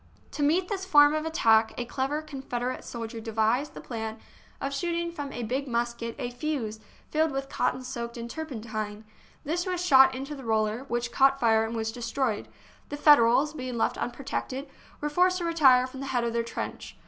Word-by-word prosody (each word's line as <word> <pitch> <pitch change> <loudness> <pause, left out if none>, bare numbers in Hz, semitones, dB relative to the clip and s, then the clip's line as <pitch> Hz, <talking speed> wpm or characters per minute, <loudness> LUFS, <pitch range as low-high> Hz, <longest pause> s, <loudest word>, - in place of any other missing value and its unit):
To - - -5
meet 335 +6 +2
this 390 -1 -3
form 295 -5 +6
of 310 +1 -1
attack, 225 -8 +3
a 245 - -2
clever 270 +5 -2
Confederate 255 -4 -4
soldier 230 -1 -6
devised 225 +5 0
the - - -7
plan 225 -2 -5 0.4
of 275 0 -3
shooting 340 +2 -1
from 290 -4 -6
a 245 - -5
big 260 +5 -2
musket 235 -1 -2
a 245 - -4
fuse 245 -5 -3 0.3
filled 315 +1 +2
with 275 -1 -4
cotton 255 - -1
soaked 235 -2 -5
in 235 0 -5
turpen 275 -4 -6
tine. 215 -1 -5 0.4
This 345 +5 -2
was 360 -1 -1
shot 265 -4 +7
into 275 +3 -5
the 275 -2 -8
roller, 220 +2 0
which 240 -1 -2
caught 270 +1 +4
fire 225 -2 +4
and 225 +1 -3
was 225 0 -2
destroyed; 235 -1 -2
and - - -27
the 290 - -4
Federals, 290 0 +5
being 255 -4 -5
left - - +1
unprotected, 270 +2 -4 0.3
were 295 - 0
forced 365 +3 +3
to 350 - -3
retire 270 -7 +5
from 260 +1 -9
the 275 - -5
head 245 -3 0
of 235 -1 -1
their 235 - +1
trench. 230 - -6
260 Hz, 195 wpm, -27 LUFS, 230-295 Hz, 0.4 s, shot